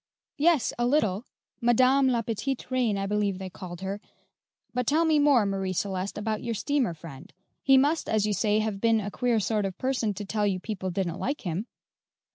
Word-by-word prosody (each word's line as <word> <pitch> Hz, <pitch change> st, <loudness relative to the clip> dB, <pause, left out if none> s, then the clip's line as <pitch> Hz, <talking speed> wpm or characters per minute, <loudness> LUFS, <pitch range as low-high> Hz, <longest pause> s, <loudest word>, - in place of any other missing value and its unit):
"Yes, 315 Hz, -3 st, +3 dB
a 240 Hz, -, +2 dB
little 220 Hz, -6 st, +1 dB, 0.3 s
Madame 255 Hz, +3 st, +4 dB
La 240 Hz, -3 st, +1 dB
Petite 245 Hz, +4 st, -3 dB
Reine, 245 Hz, -5 st, +1 dB
I 195 Hz, -, -2 dB
believe 205 Hz, -1 st, 0 dB
they 190 Hz, -1 st, -7 dB
called 175 Hz, -1 st, -8 dB
her; 195 Hz, +2 st, -4 dB, 0.7 s
but 250 Hz, -1 st, -1 dB
tell 315 Hz, +4 st, +3 dB
me 310 Hz, -2 st, +3 dB
more, 280 Hz, -7 st, +5 dB
Marie 195 Hz, -1 st, -1 dB
Celeste, 190 Hz, +1 st, -2 dB
about 215 Hz, 0 st, -2 dB
your 230 Hz, -1 st, -3 dB
steamer 250 Hz, -, 0 dB
friend. 155 Hz, +2 st, -11 dB, 0.3 s
He 270 Hz, -1 st, +5 dB
must, 295 Hz, +5 st, +2 dB
as 215 Hz, -1 st, +2 dB
you 210 Hz, -, 0 dB
say, 210 Hz, +2 st, +2 dB
have 215 Hz, -2 st, -3 dB
been 230 Hz, -1 st, +3 dB
a 205 Hz, -1 st, -4 dB
queer 240 Hz, -1 st, +1 dB
sort 210 Hz, 0 st, 0 dB
of 195 Hz, -2 st, -3 dB
a -, -, -58 dB
person 250 Hz, -6 st, -1 dB
to 205 Hz, -, -5 dB
tell 210 Hz, +1 st, 0 dB
you 190 Hz, -2 st, 0 dB
people 190 Hz, -2 st, -4 dB
didn't 175 Hz, -2 st, -2 dB
like 280 Hz, +3 st, -2 dB
him." 185 Hz, +5 st, -3 dB
215 Hz, 205 wpm, -27 LUFS, 195-255 Hz, 0.7 s, more